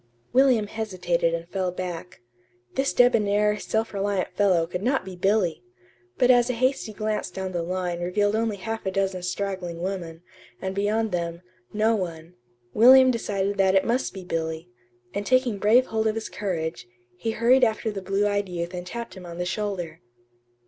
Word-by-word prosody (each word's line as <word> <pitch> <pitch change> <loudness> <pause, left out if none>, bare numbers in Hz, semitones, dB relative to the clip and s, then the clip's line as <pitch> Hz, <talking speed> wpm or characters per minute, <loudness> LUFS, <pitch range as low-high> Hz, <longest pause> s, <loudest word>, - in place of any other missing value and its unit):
William 255 -4 +4
hesitated 185 -6 -1
and 170 0 -6
fell 185 -1 -1
back. 180 -5 -6 0.5
This 270 +1 +1
debonair, 210 -4 +3
self 220 0 -2
reliant 200 -1 -1
fellow 185 -5 +3
could 180 +2 -5
not 255 0 0
be 190 -1 -7
Billy! 190 -2 +1 0.6
But 250 0 +5
as 245 0 +4
a - - +1
hasty 255 -1 0
glance 215 0 -2
down 190 -1 -5
the 175 -2 -2
line 180 0 -2
revealed 205 +4 +1
only 220 -2 0
half 225 +3 -5
a - - 0
dozen 190 -1 -1
straggling 180 -2 -3
women, 175 -3 -5 0.4
and 190 0 -3
beyond 210 +2 0
them, 170 0 -3 0.3
no 220 +2 +2
one, 170 -3 -5 0.4
William 255 +3 +8
decided 200 -4 -2
that 190 0 +4
it 190 - +4
must 245 +3 0
be 190 -1 -8
Billy; 160 -5 -4 0.4
and 200 - -2
taking 245 -2 +2
brave 230 +6 +5
hold 220 -1 -1
of 215 - 0
his 225 - -4
courage, 170 -8 -3 0.3
he 170 - -3
hurried 240 +4 +4
after 220 -1 +1
the 200 -2 -5
blue 195 +2 0
eyed 205 -1 -1
youth 170 0 -4
and 180 0 -6
tapped 235 +4 -6
him 185 -2 -10
on 170 0 -8
the 180 - -2
shoulder. 180 -5 -3
195 Hz, 175 wpm, -25 LUFS, 180-220 Hz, 0.6 s, William